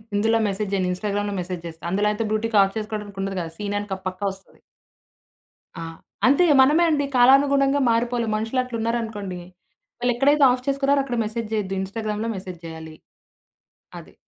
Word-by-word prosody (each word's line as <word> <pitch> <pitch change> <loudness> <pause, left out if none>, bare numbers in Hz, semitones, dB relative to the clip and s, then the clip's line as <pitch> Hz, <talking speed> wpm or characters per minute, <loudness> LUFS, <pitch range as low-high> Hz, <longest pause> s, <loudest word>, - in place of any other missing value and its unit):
ఇందులో 225 +2 +2
మెసేజ్ 200 0 -3
జేయను. 185 -2 0
ఇన్స్టాగ్రామ్‌లో 205 +1 -2
మెసేజ్ 175 -1 -6
జేస్తా. 160 -1 -11
అందులో 205 +2 +2
అయితే 210 +2 -2
బ్లూటిక్ 215 -1 +1
ఆఫ్ 195 +2 -3
చేసుకోవడానికి 210 -2 -5
ఉండదు 195 -1 -3
కదా! 165 -1 -6
సీన్ 205 -1 -3
అని 205 0 -7
క - - -3
పక్కా 185 +2 -4
ఒస్తది. 195 0 -21 1.2
ఆ! - - -5 0.4
అంతే 285 +7 +5 0.2
మనమే 300 +6 +5
అండి. 290 -3 +1
కాలానుగుణంగా 275 +2 +5
మారిపోవాలి. 235 0 0
మనుషులట్లూన్నారనుకోండి, 225 -4 -2 0.6
వాళ్ళేక్కడైతే 270 +4 +3
ఆఫ్ 250 0 -3
చేసుకున్నారో 275 0 +2
అక్కడ 245 -3 -3
మెసేజ్ 220 0 -5
చేయొద్దు, 195 -3 -1
ఇన్స్టాగ్రామ్‌లో 215 +2 -3
మెసేజ్ 185 -2 -8
చేయాలి. 160 -1 -9 1.0
అది. - - -16
215 Hz, 145 wpm, -23 LUFS, 195-245 Hz, 1.2 s, అంతే